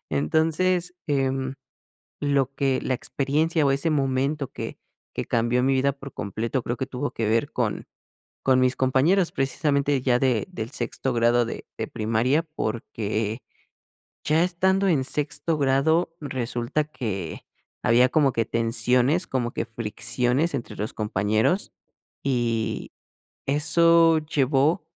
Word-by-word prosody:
Entonces, 165 Hz, -, +1 dB
em, 135 Hz, -2 st, 0 dB, 0.7 s
lo 140 Hz, -2 st, +1 dB
que, 135 Hz, -2 st, 0 dB
la 130 Hz, -, -1 dB
experiencia 150 Hz, +5 st, 0 dB
o 135 Hz, -, +4 dB
ese 140 Hz, +4 st, 0 dB
momento 140 Hz, 0 st, 0 dB
que -, -, -6 dB, 0.4 s
que -, -, -3 dB
cambió 120 Hz, +2 st, +1 dB
mi 135 Hz, +1 st, +2 dB
vida 135 Hz, +1 st, +2 dB
por 140 Hz, -1 st, -11 dB
completo, 115 Hz, +5 st, -3 dB
creo 120 Hz, -, -3 dB
que 130 Hz, -, -2 dB
tuvo 135 Hz, +2 st, -4 dB
que 115 Hz, -, -2 dB
ver 115 Hz, +1 st, +1 dB
con -, -, -2 dB, 0.6 s
con 130 Hz, -1 st, +4 dB
mis 130 Hz, 0 st, +2 dB
compañeros, 150 Hz, +8 st, +2 dB
precisamente 140 Hz, 0 st, 0 dB
ya 125 Hz, -2 st, +2 dB
de 125 Hz, -5 st, +1 dB
del 115 Hz, -10 st, -5 dB
sexto 125 Hz, +2 st, -2 dB
grado 120 Hz, 0 st, +3 dB
de 115 Hz, -, -7 dB
de -, -, -4 dB
primaria, 115 Hz, +8 st, +1 dB
porque, 110 Hz, -1 st, -2 dB, 0.9 s
ya 155 Hz, +2 st, +3 dB
estando 190 Hz, +2 st, +1 dB
en 145 Hz, -7 st, +2 dB
sexto 150 Hz, +3 st, -1 dB
grado, 160 Hz, +5 st, +2 dB
resulta 125 Hz, 0 st, -2 dB
que 105 Hz, -, -5 dB, 0.4 s
había 125 Hz, +2 st, +5 dB
como 140 Hz, -1 st, +3 dB
que 115 Hz, -, 0 dB
tensiones, 125 Hz, -, +1 dB
como 125 Hz, -2 st, -1 dB
que -, -, -2 dB
fricciones 120 Hz, +7 st, -1 dB
entre 120 Hz, -, -4 dB
los 105 Hz, +2 st, -3 dB
compañeros, 110 Hz, -, 0 dB, 0.5 s
y 115 Hz, -4 st, -1 dB, 0.6 s
eso 165 Hz, +3 st, +4 dB
llevó 150 Hz, +2 st, +1 dB
135 Hz, 130 wpm, -25 LUFS, 120-150 Hz, 0.9 s, había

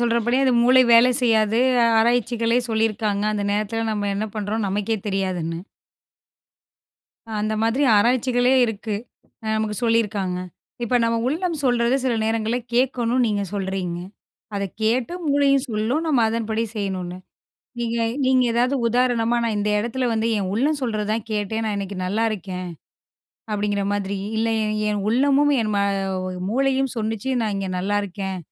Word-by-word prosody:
சொல்றபடியே 240 Hz, +2 st, +1 dB
அது 260 Hz, -, +3 dB
மூளை 255 Hz, +1 st, +6 dB
வேலை 235 Hz, +2 st, +7 dB
செய்யாது. 220 Hz, -2 st, +2 dB, 0.4 s
ஆராய்ச்சிகளே 235 Hz, 0 st, +2 dB
சொல்லி 225 Hz, 0 st, +2 dB
இருக்காங்க 210 Hz, -1 st, -2 dB
அந்த 205 Hz, -1 st, -2 dB
நேரத்துல 215 Hz, +2 st, -1 dB
நாம 205 Hz, -1 st, -1 dB
என்ன 215 Hz, +2 st, -2 dB
பண்றோம் 215 Hz, +1 st, -2 dB
நமக்கே 205 Hz, +3 st, -1 dB
தெரியாதுன்னு. 185 Hz, -4 st, -2 dB, 1.8 s
அந்த 215 Hz, +1 st, -1 dB
மாதிரி 230 Hz, +5 st, +1 dB
ஆராய்ச்சிகளே 245 Hz, +3 st, +3 dB
இருக்கு. 220 Hz, -1 st, -3 dB, 0.5 s
அ -, -, -6 dB
நமக்குச் 215 Hz, +1 st, -2 dB
சொல்லி 230 Hz, 0 st, +3 dB
இருக்காங்க. 195 Hz, -4 st, -3 dB, 0.5 s
இப்ப 235 Hz, -, -1 dB
நம்ம 230 Hz, 0 st, +1 dB
உள்ளம் 335 Hz, +3 st, -1 dB
சொல்றதை 245 Hz, 0 st, +2 dB
சில 250 Hz, -2 st, +1 dB
நேரங்கள்ல 225 Hz, +1 st, 0 dB, 0.2 s
கேக்கணும் 250 Hz, -1 st, +2 dB
நீங்கச் 205 Hz, -3 st, -2 dB
சொல்றீங்க. 190 Hz, -3 st, -3 dB, 0.6 s
அதைக் 200 Hz, -2 st, -4 dB
கேட்டு, 235 Hz, +7 st, +1 dB, 0.2 s
மூளையும் 280 Hz, -1 st, +3 dB
சொல்லும், 225 Hz, +7 st, 0 dB
நாம 270 Hz, -7 st, +3 dB
அதன்படி 225 Hz, 0 st, -1 dB
செய்யணும்னு. 185 Hz, -3 st, -3 dB, 0.6 s
நீங்க 235 Hz, -1 st, -2 dB, 0.3 s
நீங்க 260 Hz, -1 st, +4 dB
ஏதாவது 245 Hz, +3 st, +2 dB
உதாரணமா 240 Hz, -1 st, +2 dB
நான் 225 Hz, -2 st, 0 dB
இந்த 205 Hz, +1 st, 0 dB
இடத்துல 240 Hz, +4 st, -2 dB
வந்து 220 Hz, 0 st, 0 dB
என் 190 Hz, -2 st, -2 dB
உள்ளம் 285 Hz, +7 st, +1 dB
சொல்றதைதான் 215 Hz, -2 st, -1 dB
கேட்டேன், 215 Hz, +1 st, -2 dB
நான் 215 Hz, -1 st, -1 dB
இன்னைக்கு 200 Hz, 0 st, -5 dB
நல்லா 205 Hz, +5 st, 0 dB
இருக்கேன். 185 Hz, -3 st, -5 dB, 0.8 s
அப்படிங்கிற 205 Hz, -1 st, -1 dB
மாதிரி 200 Hz, -1 st, -2 dB, 0.2 s
இல்ல 225 Hz, +1 st, +1 dB
என் 215 Hz, 0 st, -1 dB
என் 210 Hz, -1 st, -1 dB
உள்ளமும் 280 Hz, +4 st, +3 dB
என் 215 Hz, -1 st, -1 dB, 0.8 s
மூளையும் 270 Hz, +2 st, +1 dB
சொல்லிச்சு 225 Hz, +2 st, -3 dB
நான் 215 Hz, -2 st, -1 dB
இங்க 195 Hz, -1 st, -3 dB
நல்லா 200 Hz, +3 st, 0 dB
இருக்கேன். 190 Hz, 0 st, -5 dB
225 Hz, 145 wpm, -22 LUFS, 205-245 Hz, 1.8 s, வேலை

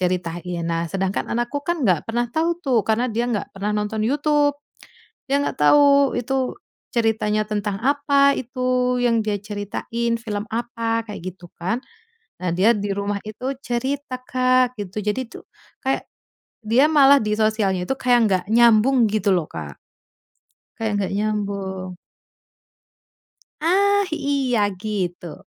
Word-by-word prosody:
ceritain. 175 Hz, -1 st, -2 dB
Nah, 165 Hz, 0 st, -1 dB
sedangkan 190 Hz, 0 st, -1 dB
anakku 240 Hz, +5 st, -2 dB
kan 345 Hz, -2 st, -1 dB
nggak 175 Hz, -4 st, +2 dB
pernah 240 Hz, +1 st, -1 dB
tau 325 Hz, +6 st, +1 dB
tuh, 250 Hz, -, +1 dB
karena 230 Hz, +3 st, +1 dB
dia 230 Hz, +2 st, -1 dB
nggak 210 Hz, -4 st, -2 dB
pernah 200 Hz, +2 st, -2 dB
nonton 210 Hz, +1 st, -2 dB
YouTube, 290 Hz, +1 st, +2 dB, 0.7 s
dia 280 Hz, +1 st, +2 dB
nggak -, -, -2 dB
tau 280 Hz, -, +5 dB
itu 260 Hz, +1 st, -1 dB, 0.4 s
ceritanya 220 Hz, -2 st, +1 dB
tentang 205 Hz, -1 st, -2 dB
apa, 280 Hz, 0 st, +3 dB
itu 250 Hz, 0 st, 0 dB
yang 235 Hz, -2 st, +2 dB
dia 210 Hz, -1 st, -1 dB
ceritain 210 Hz, +3 st, -3 dB
film 210 Hz, -2 st, -4 dB
apa? 230 Hz, -1 st, -2 dB
Kayak 210 Hz, -, -7 dB, 0.2 s
gitu 175 Hz, -1 st, -14 dB
kan. 190 Hz, +8 st, -1 dB, 0.6 s
Nah, 180 Hz, -, 0 dB
dia 215 Hz, +6 st, +4 dB
di 205 Hz, -1 st, -3 dB
rumah 200 Hz, 0 st, -2 dB
itu 255 Hz, +6 st, -4 dB
cerita 255 Hz, +1 st, -3 dB
Kak, 255 Hz, 0 st, +2 dB
gitu. 200 Hz, 0 st, -5 dB
Jadi 210 Hz, +5 st, -1 dB
tuh, -, -, -12 dB, 0.4 s
kayak 265 Hz, +1 st, -1 dB, 0.6 s
dia 235 Hz, +7 st, +4 dB
malah 280 Hz, -2 st, +7 dB
di 210 Hz, 0 st, 0 dB
sosialnya 215 Hz, -4 st, +1 dB
itu 265 Hz, -, 0 dB
kayak 245 Hz, -1 st, +3 dB
nggak 185 Hz, -1 st, +1 dB
nyambung, 235 Hz, +1 st, +5 dB
gitu 210 Hz, -2 st, +1 dB
loh, 170 Hz, -4 st, 0 dB
Kak. 75 Hz, -4 st, -8 dB, 1.0 s
Kayak 220 Hz, -1 st, -1 dB
nggak 190 Hz, -, -3 dB
nyambung. 195 Hz, -3 st, -3 dB, 1.6 s
Ah, 400 Hz, +4 st, +3 dB
iya 275 Hz, -6 st, 0 dB, 0.2 s
gitu. 180 Hz, -6 st, -4 dB
230 Hz, 140 wpm, -22 LUFS, 205-260 Hz, 1.6 s, malah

